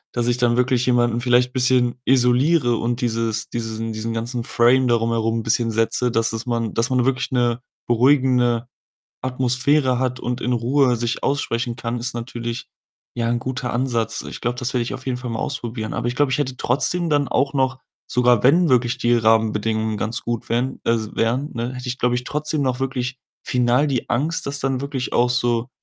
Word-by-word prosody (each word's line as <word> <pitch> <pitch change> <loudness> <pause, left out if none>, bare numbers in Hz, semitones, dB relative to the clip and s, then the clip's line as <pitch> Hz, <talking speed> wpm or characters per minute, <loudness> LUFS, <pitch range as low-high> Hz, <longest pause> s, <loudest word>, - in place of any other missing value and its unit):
dass 120 -1 0
ich 120 0 +1
dann 120 -1 +2
wirklich 125 0 +2
jemanden 120 -1 +2
vielleicht 125 +1 +2
bisschen 125 -1 +2
isoliere 125 +1 +3
und 120 +1 -2
dieses 115 -2 -1
diesen 115 -1 -4
diesen 110 +1 -4
ganzen 115 +1 -3
Frame 125 +3 +3
darum 115 -1 +2
herum 115 0 0
bisschen 115 +1 +1
setze, 115 +2 0
dass 115 0 +1
es 115 +1 -4
man 115 -3 -2
dass 115 +2 +1
man 125 -1 +2
wirklich 135 +1 0
'ne 120 -1 +1 0.3
beruhigende 125 -1 +3 0.6
Atmosphäre 130 +1 +1
hat 130 -1 -1
und 125 +1 -3
in 125 - -1
Ruhe 125 +2 +2
sich 120 +1 -2
aussprechen 120 -4 -1
kann, 115 0 -3
ist 120 +2 -3
natürlich, 120 0 -5 0.5
ja, 115 -1 -1
'n 120 0 0
guter 125 0 -4
Ansatz. 115 -3 -1
Ich - - -9
glaube, 120 +1 -2
das 125 0 -2
werde 125 -2 +1
ich 115 - -5
auf 130 0 -8
jeden 130 -2 -1
Fall 125 0 -6
mal 115 - -3
ausprobieren. 120 -5 -4
Aber - - -2
ich 120 - -5
glaube, 145 -2 +2
ich 130 - +1
hätte 130 -3 -2
trotzdem 165 +8 0
dann 145 -3 +1
auch 135 +2 +1
noch, 130 -1 0 0.3
sogar 125 -2 +2
wenn 165 +7 +5
wirklich 125 0 +2
die 120 -1 +2
Rahmenbedingungen 110 -1 +1
ganz 110 +3 -3
gut 120 -1 -4
wären 125 +3 -1
als 110 -2 -1
wären, 125 +6 0
ne, 120 +2 -3
hätte 125 0 -7
ich, 125 - -3
glaube 125 0 +2
ich, 125 - -3
trotzdem 150 +1 -2
noch 130 -1 -1
wirklich 130 -1 -2 0.3
final 125 +3 +2
die 130 -4 -2
Angst, 150 +7 -1
das 140 0 -3
dann 135 -1 -1
wirklich 140 -2 -4
auch 120 +1 +3
so 120 0 0
125 Hz, 195 wpm, -21 LUFS, 115-130 Hz, 0.6 s, wenn